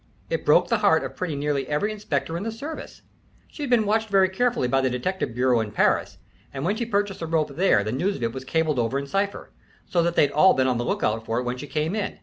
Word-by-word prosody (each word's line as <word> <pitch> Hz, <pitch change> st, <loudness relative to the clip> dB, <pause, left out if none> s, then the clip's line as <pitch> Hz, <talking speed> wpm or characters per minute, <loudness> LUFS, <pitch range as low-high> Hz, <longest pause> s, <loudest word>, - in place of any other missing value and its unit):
It -, -, -2 dB
broke -, -, +5 dB
the -, -, +1 dB
heart -, -, +3 dB
of -, -, -6 dB
pretty 180 Hz, -5 st, -3 dB
nearly 140 Hz, -2 st, -1 dB
every 150 Hz, +9 st, 0 dB
inspector 205 Hz, -5 st, -3 dB
in 170 Hz, -, -3 dB
the 225 Hz, +2 st, -3 dB
service. 285 Hz, +8 st, -8 dB, 0.4 s
She'd 290 Hz, -4 st, -6 dB
been 235 Hz, -3 st, +3 dB
watched 220 Hz, +1 st, +1 dB
very 195 Hz, -2 st, +4 dB
carefully 235 Hz, -, 0 dB
by 135 Hz, +2 st, +2 dB
the 130 Hz, -, +1 dB
detective 125 Hz, +1 st, -3 dB
bureau 125 Hz, -1 st, +3 dB
in 110 Hz, -1 st, -2 dB
Paris, -, -, +1 dB, 0.3 s
and 135 Hz, +2 st, -5 dB
when 205 Hz, +4 st, +1 dB
she 235 Hz, +1 st, -3 dB
purchased 205 Hz, -3 st, -1 dB
the 165 Hz, -, -4 dB
rope 155 Hz, -3 st, 0 dB
there, 175 Hz, -, +3 dB
the 110 Hz, -, -3 dB
news 180 Hz, -, 0 dB
of 120 Hz, -, -6 dB
it 115 Hz, 0 st, -1 dB
was 130 Hz, -, -6 dB
cabled 155 Hz, 0 st, 0 dB
over 120 Hz, +3 st, 0 dB
in 140 Hz, -, -3 dB
cipher, 195 Hz, +7 st, -2 dB, 0.3 s
so 175 Hz, -, +1 dB
that 170 Hz, 0 st, 0 dB
they'd 145 Hz, -, +4 dB
all 155 Hz, +7 st, +5 dB
be 130 Hz, -, +2 dB
on 125 Hz, -2 st, +1 dB
the -, -, -1 dB
lookout 110 Hz, -1 st, -1 dB
for 115 Hz, +1 st, -2 dB
it 125 Hz, -, 0 dB
when 125 Hz, 0 st, -3 dB
she 145 Hz, -, -7 dB
came 155 Hz, +4 st, -1 dB
in. 210 Hz, -3 st, -3 dB
160 Hz, 260 wpm, -24 LUFS, 130-200 Hz, 0.4 s, broke